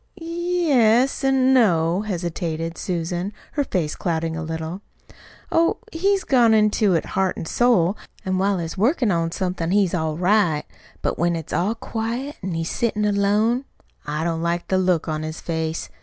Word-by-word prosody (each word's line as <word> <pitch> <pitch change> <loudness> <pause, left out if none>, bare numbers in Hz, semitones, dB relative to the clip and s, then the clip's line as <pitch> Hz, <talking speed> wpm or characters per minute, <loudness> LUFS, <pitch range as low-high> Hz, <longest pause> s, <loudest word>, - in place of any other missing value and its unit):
"Y 330 - -9
yes, 300 -9 +2
an' 265 -1 +3
no," 175 -7 +3
hesitated 170 -4 -3
Susan, 175 +2 -3 0.2
her 290 - 0
face 175 - -2
clouding 165 -2 -2
a 160 - -4
little. 160 +3 -5 0.7
"Oh, 335 0 +3
he's 390 +4 +1
gone 235 -4 +4
into 210 -2 +3
it 165 - 0
heart 190 -1 -1
an' - - -5
soul; 200 -3 +3 0.3
an' 185 0 0
while 195 0 +2
he's 165 -2 -4
workin' 235 - +2
on 165 -1 0
somethin' 180 -2 -2
he's 195 -1 +2
all 160 -3 -1
right. 180 -4 +2 0.4
But - - -1
when 170 +1 +2
it's 165 -1 -6
all 200 +6 +1
quiet, 235 +6 -4
an' 185 -2 -3
he's 165 0 -2
settin' 215 -3 0
alone, 210 +5 +2 0.4
I 150 +2 -3
don't 165 -1 -1
like 170 +1 -2
the 190 - +2
look 180 -3 +1
on 155 -1 -2
his 155 +1 -5
face. 160 -1 -3
185 Hz, 170 wpm, -22 LUFS, 165-230 Hz, 0.7 s, gone